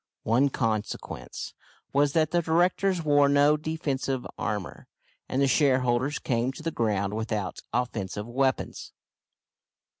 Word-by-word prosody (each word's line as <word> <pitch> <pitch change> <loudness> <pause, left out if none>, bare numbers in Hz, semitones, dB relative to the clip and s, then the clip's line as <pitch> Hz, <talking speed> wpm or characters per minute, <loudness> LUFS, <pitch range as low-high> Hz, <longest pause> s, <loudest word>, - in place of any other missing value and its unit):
One 125 +6 +3
consequence 110 -5 -3 0.4
was, 140 0 +3
that 155 -2 +2
the 175 - +2
directors 175 +2 +2
wore 145 -2 +4
no 145 +1 +5
defensive 140 -4 -2
armour, 105 -4 -4 0.4
and 130 - -1
the - - +4
shareholders 130 -1 +2
came 120 +1 0
to 160 - -10
the 165 - -1
ground 105 -6 0
without 105 -3 -3
offensive 105 -5 -2
weapons. 130 +2 -1
135 Hz, 120 wpm, -27 LUFS, 115-150 Hz, 0.4 s, no